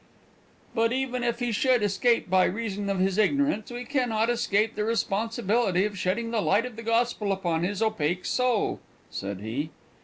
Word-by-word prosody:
"But, 230 -1 +2
even 255 -1 -1
if 235 -1 0
he 245 -1 0
should 245 +1 +2
escape 230 +4 +2
by 185 0 +4
reason 205 -1 -3
of 195 - 0
his 190 +2 +1
ignorance, 280 0 +1
we 245 0 -6
can 255 -2 0
not 225 +1 +1
escape 225 -2 +1
the 210 - -2
responsibility 220 -2 +1
of 210 -1 -3
shedding 215 +5 -1
the 225 -2 +1
light 205 +4 +2
of 250 -3 -7
the 230 - -7
gospel 230 -2 0
upon 175 -4 -1
his 200 +4 -1
opaque 180 -5 0
soul," 250 -4 +1 0.3
said 100 -1 -5
he. 125 +9 -3
220 Hz, 180 wpm, -27 LUFS, 195-240 Hz, 0.3 s, by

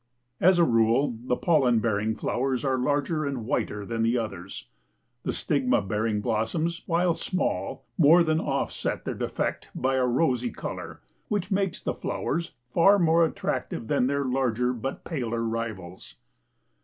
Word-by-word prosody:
As 185 +1 +5
a 170 - +5
rule, 115 0 +3
the 125 - +1
pollen 135 -9 +3
bearing 110 -1 0
flowers 130 +4 -1
are 130 -1 +1
larger 145 +4 0
and 135 -6 -3
whiter 105 -3 -2
than 115 +2 -2
the 115 +2 +2
others. 100 -5 -5 0.6
The - - -2
stigma 135 -4 +1
bearing 105 +2 -1
blossoms, 120 +11 -1
while 170 +1 +2
small, 185 +3 -2
more 165 +3 +7
than 160 -1 +1
offset 140 -3 -2
their - - -2
defect - - -3
by 130 +1 +1
a 130 - +2
rosy 125 -2 +1
color - - -7 0.3
which 205 -1 -2
makes 195 -2 0
the - - -1
flowers 170 +2 -3 0.2
far 195 +4 +6
more 165 -2 +4
attractive 155 -6 -2
than 125 - +2
their 140 0 0
larger 125 -1 +1
but 125 +2 -5
paler 120 -7 -2
rivals. 110 -6 -5
130 Hz, 150 wpm, -26 LUFS, 115-160 Hz, 0.6 s, more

